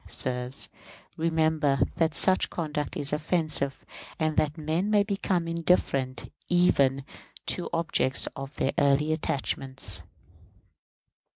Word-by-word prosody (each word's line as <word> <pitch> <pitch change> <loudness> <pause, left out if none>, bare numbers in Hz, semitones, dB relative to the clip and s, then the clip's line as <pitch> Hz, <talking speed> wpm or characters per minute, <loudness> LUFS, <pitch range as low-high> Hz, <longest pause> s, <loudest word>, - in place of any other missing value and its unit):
Sirs, 125 +1 +2 0.5
remember 160 -3 +1 0.2
that 160 -1 +1
such 190 0 +3
conduct 150 -3 -4
is 145 0 +1
offensive, 155 -3 -1 0.3
and 155 -1 -1
that 150 +1 0
men 160 +6 -1
may 210 -1 +4
become 195 -4 -2
indifferent 150 -7 0 0.2
even 140 -7 +2 0.4
to 180 - 0
the - - -6
objects 165 -5 +1
of 135 +1 -8
their - - 0
early 145 +2 +2
attachments. 135 -3 +1
155 Hz, 110 wpm, -27 LUFS, 140-165 Hz, 0.5 s, may